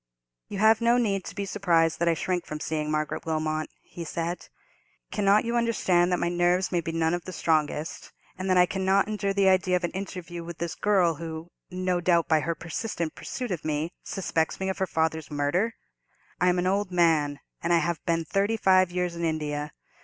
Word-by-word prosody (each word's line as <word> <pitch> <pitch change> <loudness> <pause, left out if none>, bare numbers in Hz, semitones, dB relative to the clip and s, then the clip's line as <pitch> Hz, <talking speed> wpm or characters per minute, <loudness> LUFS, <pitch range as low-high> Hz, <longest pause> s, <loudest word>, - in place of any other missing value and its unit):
"You 200 - -6
have 220 +2 +5
no 235 +1 +4
need 200 -6 0
to - - -8
be 200 - -2
surprised 170 -5 +2
that 170 - +1
I 165 - +3
shrink 175 +1 -2
from 155 - -5
seeing 155 -1 -2
Margaret 155 0 -1
Wilmot," 155 -1 -1
he 170 - -8
said. 170 +2 -4 0.6
"Cannot 205 +1 +3
you 235 +1 -1
understand 185 -7 +2
that 180 - +2
my - - 0
nerves 175 +2 +1
may 175 -2 +1
be 165 - -4
none 165 0 +1
of 175 -1 -3
the 185 - -6
strongest, 155 -2 -1 0.2
and 185 +1 -4
that 185 - +4
I 180 - +7
cannot 190 +2 +1
endure 210 -2 -1
the 200 -1 +3
idea 185 -1 +3
of 180 - -1
an 175 - -1
interview 180 -3 -6
with 170 0 -8
this 170 -1 -3
girl, 190 -5 +2
who, 160 +1 -7 0.2
no 180 -1 -1
doubt, 170 -1 +3
by 160 -1 +4
her 165 +3 -2
persistent 170 -1 -4
pursuit 250 -4 -5
of 175 -4 -3
me, 155 +2 -2
suspects 165 -4 -1
me 190 0 -1
of 190 - -3
her 190 - +1
father's 160 -2 -1
murder? 155 +10 0 0.6
I 180 - +4
am 180 - +2
an 180 - 0
old 195 +1 +1
man, 160 -5 +2 0.2
and 170 - -1
I 170 - +6
have 170 0 -1
been 165 -1 +1
thirty 200 +7 +1
five 185 -3 +4
years 180 -1 -2
in 170 - -4
India. 150 -2 -2
175 Hz, 210 wpm, -27 LUFS, 160-190 Hz, 0.6 s, I